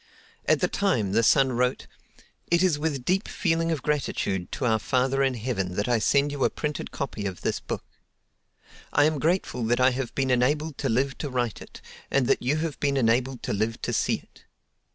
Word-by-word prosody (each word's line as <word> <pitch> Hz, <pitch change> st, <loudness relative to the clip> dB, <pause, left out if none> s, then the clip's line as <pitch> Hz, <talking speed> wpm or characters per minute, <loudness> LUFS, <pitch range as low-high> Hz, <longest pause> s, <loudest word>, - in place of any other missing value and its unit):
At -, -, +3 dB
the -, -, +3 dB
time 120 Hz, -, 0 dB
the 110 Hz, +3 st, +3 dB
son 135 Hz, +3 st, +4 dB
wrote: 125 Hz, +1 st, 0 dB, 0.6 s
It 170 Hz, +1 st, +3 dB
is 170 Hz, -6 st, +2 dB
with 145 Hz, -5 st, -2 dB
deep 190 Hz, +3 st, +1 dB
feeling 165 Hz, -2 st, 0 dB
of 155 Hz, -5 st, -2 dB
gratitude 115 Hz, -10 st, -1 dB
to 135 Hz, -, -2 dB
Our 110 Hz, -2 st, +3 dB
Father 130 Hz, +4 st, +1 dB
in 135 Hz, -2 st, +2 dB
Heaven 105 Hz, -6 st, -2 dB
that 105 Hz, -, -1 dB
I 120 Hz, -2 st, +2 dB
send 140 Hz, +6 st, +2 dB
you 140 Hz, -2 st, -2 dB
a -, -, +4 dB
printed 150 Hz, -1 st, -4 dB
copy 110 Hz, -7 st, -4 dB
of 95 Hz, -2 st, -6 dB
this -, -, -1 dB
book. -, -, -5 dB, 1.1 s
I 145 Hz, -, +4 dB
am 155 Hz, -1 st, +2 dB
grateful 160 Hz, -6 st, 0 dB
that 120 Hz, +2 st, +1 dB
I 130 Hz, +1 st, +5 dB
have 125 Hz, -1 st, -4 dB
been 135 Hz, -1 st, +1 dB
enabled 145 Hz, +4 st, +1 dB
to -, -, -1 dB
live 130 Hz, +4 st, 0 dB
to 145 Hz, -, -3 dB
write 120 Hz, -4 st, -2 dB
it, -, -, -12 dB, 0.3 s
and 135 Hz, -2 st, +2 dB
that -, -, +2 dB
you 135 Hz, +5 st, +1 dB
have 155 Hz, -1 st, -3 dB
been 140 Hz, -1 st, +1 dB
enabled 125 Hz, +1 st, +1 dB
to -, -, -2 dB
live 110 Hz, +2 st, -1 dB
to -, -, -1 dB
see -, -, +1 dB
it. -, -, -15 dB
130 Hz, 210 wpm, -26 LUFS, 120-150 Hz, 1.1 s, I